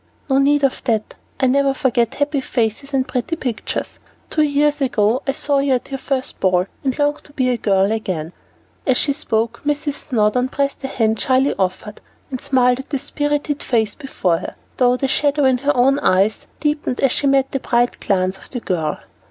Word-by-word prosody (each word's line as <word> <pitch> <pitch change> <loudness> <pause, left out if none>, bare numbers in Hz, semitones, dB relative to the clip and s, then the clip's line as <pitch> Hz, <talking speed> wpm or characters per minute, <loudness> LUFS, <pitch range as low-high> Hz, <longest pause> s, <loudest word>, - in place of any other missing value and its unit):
"No 265 - +4
need 285 +1 +3
of 275 - +1
that; 220 -4 0 0.3
I - - +3
never 275 +1 +2
forget 245 -3 +1
happy 285 -1 0
faces 240 +2 -2
and 265 -2 0
pretty 295 +7 -2
pictures. 250 -8 -4 0.3
Two 310 - +2
years 295 0 +2
ago 240 -1 +2
I - - +3
saw 285 0 +1
you 275 -1 +2
at 250 +2 -2
your 270 - -3
first 265 -1 -3
ball, 180 -1 +2 0.2
and 265 -2 -1
longed 290 0 0
to 290 - -15
be 255 -3 +1
a 245 - 0
girl 195 -2 +2
again." 180 -7 -3 0.5
As 260 -2 +4
she 285 - +1
spoke, 230 -5 -2
Mrs. 290 0 -1
Snowdon 250 -2 0
pressed 280 0 -1
the 270 - -4
hand 225 -4 0
shyly 265 +1 +2
offered, 190 +3 -2 0.3
and 255 - -4
smiled 250 -1 +2
at 270 - -8
the 285 - -1
spirited 290 +1 -2
face 220 -4 0
before 185 - -1
her, - - -7 0.2
though 250 -1 +3
the 270 - 0
shadow 290 0 +2
in 260 -1 +3
her 285 +1 0
own 270 +3 +4
eyes 200 -3 +2
deepened 295 -4 -1
as 270 -3 +3
she 280 - +1
met 270 -1 +2
the 270 - -1
bright 240 -1 +1
glance 185 -1 0
of - - -16
the 250 - -4
girl. 160 -8 -2
260 Hz, 200 wpm, -19 LUFS, 225-280 Hz, 0.5 s, No